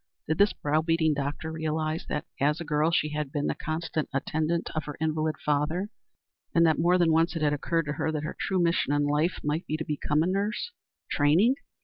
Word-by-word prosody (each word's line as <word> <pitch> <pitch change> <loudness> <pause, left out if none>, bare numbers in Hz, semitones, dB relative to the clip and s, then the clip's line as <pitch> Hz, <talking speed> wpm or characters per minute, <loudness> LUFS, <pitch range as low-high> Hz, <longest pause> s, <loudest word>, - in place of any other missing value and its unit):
Did 155 +1 -1
this 200 0 +5
brow 150 +2 0
beating 160 -1 +2
doctor 145 +3 -3
realize 160 0 -2
that, 150 - -2
as 150 +3 +2
a - - -4
girl, 150 +1 +2
she 160 -2 +1
had 150 -2 -3
been 145 -1 -1
the - - +1
constant 160 -1 -3
attendant 160 +4 -1
of 155 -1 -2
her 150 - -7
invalid 155 0 0
father, 150 +7 0 0.7
and 170 0 +6
that 160 -2 +3
more 175 +2 +4
than 170 -2 +3
once 165 +2 +2
it 160 - -2
had 145 -1 +3
occurred 165 +2 0
to 150 - -2
her 155 +2 -1
that 155 -1 -3
her 155 - -4
true 190 -2 0
mission 170 -4 +2
in 145 0 +2
life 150 +5 +1
might 150 +4 -1
be 155 - -1
to 160 - -4
become 150 +1 0
a - - 0
nurse? 205 - -1 0.4
Training? 160 - +4
155 Hz, 220 wpm, -27 LUFS, 150-165 Hz, 0.7 s, and